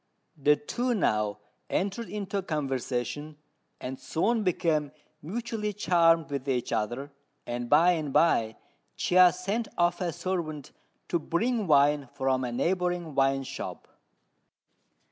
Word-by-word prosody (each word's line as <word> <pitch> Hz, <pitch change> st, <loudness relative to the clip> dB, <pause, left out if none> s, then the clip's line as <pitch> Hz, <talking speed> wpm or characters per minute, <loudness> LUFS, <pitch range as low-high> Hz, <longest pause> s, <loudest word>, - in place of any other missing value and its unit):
The 150 Hz, 0 st, +4 dB
two 240 Hz, +6 st, -2 dB
now 105 Hz, -, +1 dB, 0.3 s
entered 200 Hz, +5 st, -2 dB
into 200 Hz, -1 st, -3 dB
conversation, 145 Hz, -2 st, -3 dB, 0.4 s
and 130 Hz, +1 st, -6 dB
soon 225 Hz, +8 st, 0 dB
became 160 Hz, -6 st, 0 dB, 0.3 s
mutually 215 Hz, -, -3 dB
charmed 165 Hz, -5 st, +3 dB
with 140 Hz, -1 st, -3 dB
each 125 Hz, -2 st, -1 dB
other; 120 Hz, +7 st, -2 dB, 0.3 s
and 120 Hz, 0 st, -4 dB
by 165 Hz, +5 st, +6 dB
and 155 Hz, -5 st, -2 dB
by 115 Hz, -9 st, +3 dB, 0.4 s
Chia 180 Hz, 0 st, +5 dB
sent 200 Hz, +6 st, -2 dB
off 175 Hz, +1 st, +2 dB
a 175 Hz, -2 st, 0 dB
servant 165 Hz, -4 st, -4 dB, 0.4 s
to 170 Hz, -, +1 dB
bring 215 Hz, +7 st, 0 dB
wine 145 Hz, -2 st, +4 dB
from 130 Hz, -1 st, +1 dB
a 125 Hz, -, -2 dB
neighbouring 175 Hz, +3 st, -1 dB
wine 135 Hz, 0 st, +2 dB
shop. -, -, -7 dB
165 Hz, 125 wpm, -28 LUFS, 135-185 Hz, 0.4 s, by